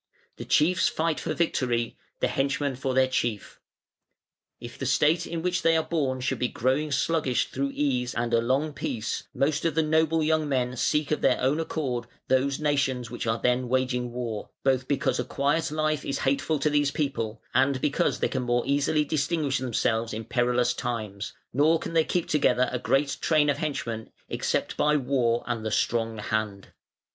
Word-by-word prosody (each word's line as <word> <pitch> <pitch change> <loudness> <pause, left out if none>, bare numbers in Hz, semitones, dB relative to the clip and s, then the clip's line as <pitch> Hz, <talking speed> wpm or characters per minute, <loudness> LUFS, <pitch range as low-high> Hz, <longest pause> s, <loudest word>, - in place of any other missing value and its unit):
The - - -7
chiefs 170 +2 +3
fight 160 -1 -1
for - - -3
victory, 120 -7 0 0.3
the - - +3
henchmen 140 0 -1
for 130 0 -2
their 130 0 +4
chief. 120 -5 -2 1.0
If 120 0 -10
the 135 - -2
state 155 +5 +2
in 165 -1 -4
which 180 0 0
they 165 0 +4
are 160 - +1
born 135 -7 -1
should 125 - -1
be 125 - +1
growing 135 +6 0
sluggish 150 -4 +1
through 140 +1 -2
ease 125 -4 0
and 120 0 -1
a 115 - +4
long 135 +6 0
peace, 115 -4 -3
most 145 +3 0
of 165 -3 0
the 160 - +3
noble 160 +1 +2
young 155 -1 +1
men 125 -2 0
seek 150 +4 0
of 155 - 0
their 130 - +3
own 135 +5 +1
accord 130 -7 -2 0.2
those 135 +2 +2
nations 140 -5 0
which 120 -1 -4
are 115 0 +1
then 125 0 +1
waging 125 -1 0
war, 120 -3 -4
both 130 -1 +1
because 135 -2 0
a - - +1
quiet 145 +4 0
life 155 -1 0
is 140 - -2
hateful 140 +3 0
to 150 +1 +1
this 145 -1 +3
people, 115 -7 -2
and 130 +1 +3
because 145 +2 +1
they - - +3
can 130 - -2
more 120 0 +1
easily 145 +2 +1
distinguish 150 -2 0
themselves 115 -2 0
in 110 0 -5
perilous 125 +1 +1
times, 110 -5 -4 0.2
nor 155 +5 +4
can 165 - -6
they 165 -1 +4
keep 175 +1 -1
together 130 -4 +2
a 125 - -2
great 135 +2 +1
train 150 -2 +3
of - - -4
henchmen, 115 -8 -3 0.2
except - - -1
by 150 0 +3
war 125 -4 +1
and 120 -2 -3
the 110 - -1
strong 115 +1 0
hand. 105 -2 -3
135 Hz, 185 wpm, -26 LUFS, 120-150 Hz, 1.0 s, their